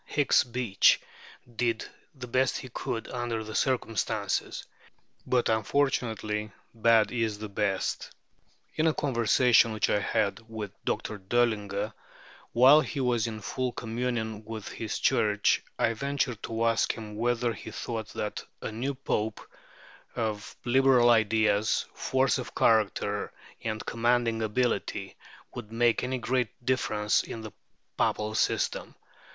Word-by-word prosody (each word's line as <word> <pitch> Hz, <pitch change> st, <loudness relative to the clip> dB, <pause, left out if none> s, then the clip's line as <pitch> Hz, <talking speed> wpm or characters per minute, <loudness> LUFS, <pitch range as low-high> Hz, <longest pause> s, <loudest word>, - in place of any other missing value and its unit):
Hicks 145 Hz, -2 st, +3 dB
Beach 120 Hz, -5 st, +3 dB, 0.6 s
did 115 Hz, -2 st, 0 dB, 0.3 s
the 130 Hz, -2 st, -7 dB
best 130 Hz, +2 st, +1 dB
he 130 Hz, -, -8 dB
could 115 Hz, -1 st, -4 dB
under 120 Hz, -3 st, -3 dB
the 110 Hz, 0 st, -8 dB
circumstances; 115 Hz, -5 st, -1 dB, 0.6 s
but, 125 Hz, -1 st, +2 dB
unfortunately, 110 Hz, -3 st, 0 dB, 0.2 s
bad 115 Hz, -1 st, +4 dB
is 115 Hz, -3 st, -1 dB
the 105 Hz, 0 st, -7 dB
best. 100 Hz, -1 st, -1 dB, 0.6 s
In 160 Hz, +1 st, +1 dB
a 160 Hz, -, +2 dB
conversation 120 Hz, -2 st, +4 dB
which 110 Hz, -, +1 dB
I 105 Hz, -, +3 dB
had 100 Hz, 0 st, 0 dB
with 110 Hz, -3 st, -5 dB
Dr. 110 Hz, -1 st, -2 dB
Döllinger 105 Hz, -1 st, 0 dB, 0.6 s
while 130 Hz, +6 st, +7 dB
he 150 Hz, -, -4 dB
was 120 Hz, -3 st, +1 dB
in 110 Hz, -1 st, -6 dB
full 125 Hz, +4 st, -2 dB
communion 115 Hz, -2 st, -3 dB
with 110 Hz, -1 st, -7 dB
his 110 Hz, -2 st, -4 dB
Church, 105 Hz, -1 st, +2 dB, 0.2 s
I 115 Hz, -, +2 dB
ventured 135 Hz, -2 st, -2 dB
to 115 Hz, 0 st, -2 dB
ask 115 Hz, 0 st, +2 dB
him 105 Hz, -2 st, -8 dB
whether 120 Hz, +1 st, 0 dB
he 110 Hz, -, -9 dB
thought 110 Hz, 0 st, -4 dB
that 105 Hz, -, -4 dB, 0.2 s
a -, -, -5 dB
new 130 Hz, +6 st, -3 dB
Pope, 110 Hz, -5 st, -2 dB, 0.8 s
of 110 Hz, -3 st, -3 dB
Liberal 125 Hz, -1 st, +5 dB
ideas, 110 Hz, -1 st, +2 dB
force 130 Hz, 0 st, +1 dB
of 125 Hz, -, -7 dB
character, 105 Hz, -2 st, +2 dB, 0.3 s
and 110 Hz, -1 st, -3 dB
commanding 115 Hz, -1 st, +1 dB
ability, 115 Hz, +3 st, -1 dB, 0.4 s
would 110 Hz, -3 st, -8 dB
make 115 Hz, 0 st, +2 dB
any 130 Hz, +1 st, -1 dB
great 125 Hz, -1 st, 0 dB, 0.2 s
difference 105 Hz, -5 st, +1 dB
in 115 Hz, -, -7 dB
the 110 Hz, -1 st, -8 dB, 0.5 s
Papal 105 Hz, 0 st, 0 dB
system. -, -, 0 dB
115 Hz, 130 wpm, -28 LUFS, 110-125 Hz, 0.8 s, while